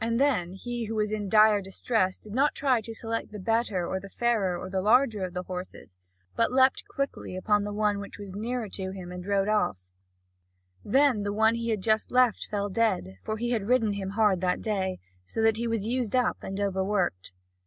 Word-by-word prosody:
Then 230 -8 +1
he 240 +3 -4
who 220 +1 -4
was 210 -1 0
in 210 -2 -2
dire 215 0 +6
distress 190 0 0
did 210 - -12
not 275 +5 +2
try 260 -4 +2
to 225 - -8
select 225 0 -4
the 210 - -7
better 210 -3 0
or 190 - -2
the 200 +1 -11
fairer 210 -6 0
or - - -6
the 190 0 -1
larger 220 -1 +3
of 180 -1 -5
the 180 - -2
horses, 180 - -8 0.4
but 230 - +2
leaped 260 +1 +3
quickly 275 -8 -4
upon 205 +2 +2
the 205 - -4
one 205 -1 +1
which 200 - -8
was 200 -2 -8
nearer 230 +3 -3
to 190 -1 -4
him, 185 -2 -7
and 180 +1 -7
rode 200 -1 +1
him 215 - +2
off. 95 - 0 1.0
Then 265 -1 +3
the 205 0 -2
one 220 +2 +3
he 230 0 -3
had 215 -3 0
just 220 0 +2
left 250 -3 +3
fell 205 -1 -1
dead, 140 - 0
for 215 - -3
he 240 +2 -2
had 215 -4 -1
ridden 230 -4 +3
him 195 -1 -4
hard 210 -5 +3
that 180 -1 +1
day, 190 -4 -1 0.3
so 95 - -7
that 225 -1 +4
he 235 +1 -2
was 225 -3 -1
used 245 -1 -1
up 250 -1 +2
and 195 +1 -5
overworked. 190 - -1
210 Hz, 215 wpm, -27 LUFS, 190-230 Hz, 1.0 s, dire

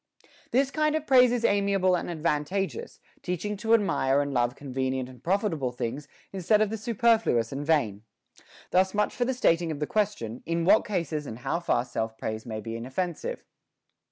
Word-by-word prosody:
This 270 +2 +2
kind 305 0 +1
of 310 -1 -2
praise 250 -3 +6
is 240 -1 0
amiable 200 -2 +2
and 175 - -3
advantageous, 170 - -2 0.2
teach 180 +1 -3
ing 210 0 -2
to 225 +3 +3
admire 140 -10 +2
and 145 -1 -1
love 120 0 +1
convenient 130 -2 -3
and 130 -1 -14
profitable 170 - 0
things 125 +4 -4 0.3
instead 195 +3 +2
of 215 -1 +1
the 225 - -2
superfluous 225 - +2
and 140 +1 -4
vain. 140 -11 +1 0.7
Thus 190 +2 +2
much 210 0 +1
for 245 - 0
the 260 +1 -1
stating 170 -8 +2
of 150 - -5
the 150 - 0
question, 170 - -2
in 165 0 0
what 205 +4 +5
cases 160 -7 -2
and 110 - -6
how 125 +7 -2
far 125 -8 0
self 110 -2 -4
praise 110 +2 -5
may 110 -1 -4
be 115 +2 -6
inoffensive. 175 - -4
170 Hz, 185 wpm, -27 LUFS, 130-210 Hz, 0.7 s, praise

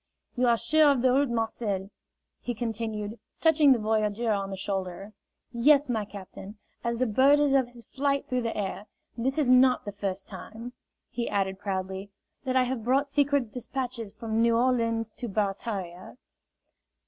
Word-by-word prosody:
"You 250 0 +2
are 235 -1 +4
sure 300 +6 +4
of 265 -4 +2
the 255 - +5
route, 280 0 +3
Marcel?" 220 -4 -2 0.5
he 245 - -4
continued, 220 -1 -4 0.2
touching 310 -3 +5
the 255 - +5
voyageur 215 +1 0
on 195 -2 -1
the 195 - -5
shoulder. 195 +1 -4 0.4
"Yes, 275 +4 +4
my 220 -4 -1
captain. 200 +1 -10 0.3
As 235 0 -1
the 255 - +1
bird 265 +6 +5
is 290 -2 +2
of 265 -3 +3
his 240 -1 -14
flight 280 0 -1
through 255 -1 -1
the 230 -1 -3
air. 205 +1 -4 0.3
This 260 +4 -1
is 300 -4 +2
not 255 0 +5
the 205 - -4
first 195 -1 -4
time," 220 +5 -9 0.4
he 240 - -3
added 190 -1 -1
proudly, 190 0 -4 0.4
"that 260 0 -1
I 260 - +5
have 250 -2 -3
brought 270 +4 +2
secret 285 -5 +1
despatches 250 -3 -4
from 225 +1 -2
New 230 0 +4
Orleans 230 -3 +1
to 245 - -6
Barataria." 195 -2 -3
230 Hz, 170 wpm, -27 LUFS, 205-255 Hz, 0.5 s, the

